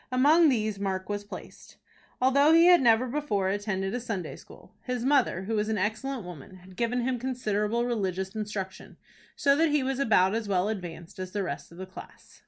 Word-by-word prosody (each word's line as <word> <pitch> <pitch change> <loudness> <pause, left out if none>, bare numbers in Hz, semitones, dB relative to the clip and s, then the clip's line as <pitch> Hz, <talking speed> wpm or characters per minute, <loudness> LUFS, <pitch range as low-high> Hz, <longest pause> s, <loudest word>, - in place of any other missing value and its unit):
Among 300 +6 +5
these 215 -5 -1
Mark 190 -1 -3
was 205 0 -3
placed. 205 - -11 0.4
Although 280 +4 +4
he 330 +1 +7
had 355 -2 +7
never 235 0 +4
before 240 -8 -1
attended 195 -1 -2
a 245 - -1
Sunday 205 -9 -4
school, - - -16
his 250 -1 -3
mother, 265 -9 +2
who 220 +4 -3
was 215 0 0
an 220 - 0
excellent 220 +5 -2
woman, 175 0 -10
had 185 0 -15
given 240 +3 0
him 250 0 -1
considerable 235 -2 -1
religious 190 -5 -2
instruction, 205 -3 -6 0.4
so 280 -1 +3
that 320 +2 +3
he 295 -2 +2
was 265 0 -2
about 200 -7 +3
as 225 -1 -2
well 190 0 +1
advanced 175 -5 -7
as 185 0 -6
the 205 -1 -1
rest 175 - -6
of 170 - -14
the 190 - -6
class. 185 - -13
215 Hz, 195 wpm, -28 LUFS, 190-255 Hz, 0.4 s, he